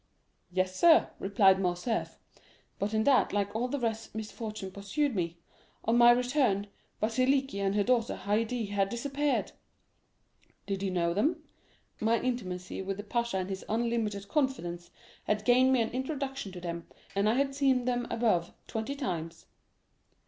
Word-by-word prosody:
'—'Yes, 185 0 0
sir,' 340 -1 +6
replied 195 -1 +4
Morcerf; 180 +5 -1 0.6
'but 200 +1 -1
in 220 - +2
that, 270 0 +4
like 205 0 -1
all 240 +3 0
the 285 +3 -2
rest, 225 -2 -3
misfortune 215 -2 -5
pursued 205 +8 -1
me. 170 -2 -2 0.5
On 230 - +3
my 240 0 +8
return, 245 -4 +3 0.3
Vasiliki 255 +1 +1
and 195 0 0
her 205 - +3
daughter 235 0 +1
Haydée 220 +2 -1
had 200 -1 +1
disappeared.'—'Did 270 -6 -5
you 195 - 0
know 170 -2 +1
them?'—'My 230 - -2
intimacy 185 -9 -3
with 195 0 -3
the 205 - -5
pasha 235 0 -1
and 185 0 -2
his 190 - -5
unlimited 220 -3 -1
confidence 190 - -1 0.4
had 210 0 0
gained 255 +1 +5
me 250 -3 +4
an 225 - -4
introduction 270 -4 -3
to 180 - -7
them, 170 -1 -5 0.3
and 200 +2 +3
I 225 - +2
had 275 +1 +1
seen 270 -3 +2
them 245 -1 0
above 210 -8 +1
twenty 225 +5 -3
times. 170 - -4
220 Hz, 150 wpm, -30 LUFS, 195-250 Hz, 0.6 s, my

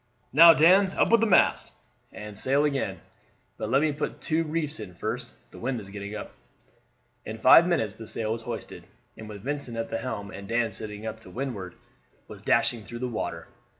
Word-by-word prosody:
"Now, 165 +3 +9
Dan, 185 +5 +5
up - - +3
with 230 -1 +5
the 230 - +3
mast; 200 - +3 0.4
and 105 -1 -9
sail 140 +7 +2
again; 140 -2 -2 0.6
but - - -4
let 135 +3 +3
me 155 - +2
put 145 +1 -4
two 165 0 0
reefs 155 -2 -2
in 95 -5 -9
first, - - -4 0.2
the - - -12
wind 125 0 -2
is 95 -2 -10
getting 100 +1 -6
up." 105 - -7 0.9
In 110 0 -6
five 130 +9 +7
minutes 110 - 0
the 110 - -9
sail 110 0 -3
was 115 - -5
hoisted, - - -7 0.3
and 110 -1 -10
with 100 -2 -9
Vincent 140 -4 -4
at 115 - -4
the 115 - -1
helm 100 -1 -5
and 100 0 -9
Dan 115 0 0
sitting 105 +1 -7
up 110 0 -5
to - - -14
windward, 115 -9 -5 0.5
was - - -11
dashing 115 -3 +1
through 120 - -8
the 125 +1 -3
water. 115 -3 -4
115 Hz, 200 wpm, -26 LUFS, 105-150 Hz, 0.9 s, Now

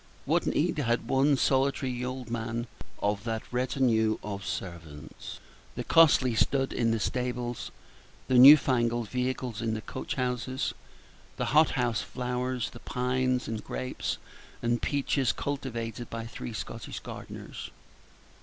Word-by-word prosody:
What - - +1
need 155 0 +1
had 120 -3 0
one 135 +2 +3
solitary 130 -2 +1
old 125 -2 -5
man 115 0 -2 0.4
of 100 0 0
that 110 -1 -2
retinue 125 -3 +2
of 100 -1 -5
servants, 80 -6 -7 0.4
the - - -3
costly 145 -6 +5
stud 135 +4 +1
in 115 - +1
the 115 0 +1
stables, 125 0 -2 0.6
the 130 -1 +5
new 140 +4 +12
fangled 120 -4 0
vehicles 125 -2 -2
in 110 -1 0
the 110 - -4
coach - - -5
houses, 130 +1 -1 0.6
the - - -1
hot 155 +1 +6
house 120 -2 +1
flowers, 125 0 -2
the 120 - -11
pines, 125 +1 0
and 110 -1 -4
grapes, 130 - -3 0.5
and 120 0 +1
peaches, 140 -2 +1
cultivated 120 -5 -4
by 115 0 -5
three 115 0 -7
Scottish - - -6
gardeners? - - -8
125 Hz, 135 wpm, -29 LUFS, 115-130 Hz, 0.6 s, new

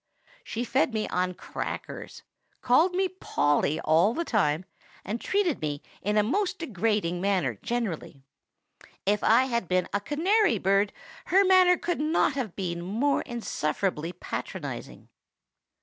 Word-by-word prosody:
She 230 - -3
fed 245 0 +1
me 215 - -1
on 180 0 -1
crackers, - - -6 0.4
called 325 +9 +3
me 380 +1 +2
Polly 150 - 0
all 165 +8 +3
the 335 - -1
time, 180 - +1 0.4
and 220 +4 -3
treated 385 -7 0
me 145 -1 -3 0.2
in 210 +2 0
a 210 - +5
most 390 - 0
degrading 210 - -1
manner 180 - 0
generally. 200 - -3 0.8
If 205 +1 +1
I 230 +4 +5
had 235 -7 -1
been 185 0 +1
a 200 - +2
canary 370 - +2
bird, 195 +2 +2 0.3
her 390 +2 +4
manner 370 -1 +6
could 345 -2 -2
not 305 -1 +2
have 250 -9 -4
been 170 -3 -3
more 230 +11 0
insufferably 175 -7 -2
patronizing. 180 - -6
215 Hz, 135 wpm, -27 LUFS, 180-300 Hz, 0.8 s, manner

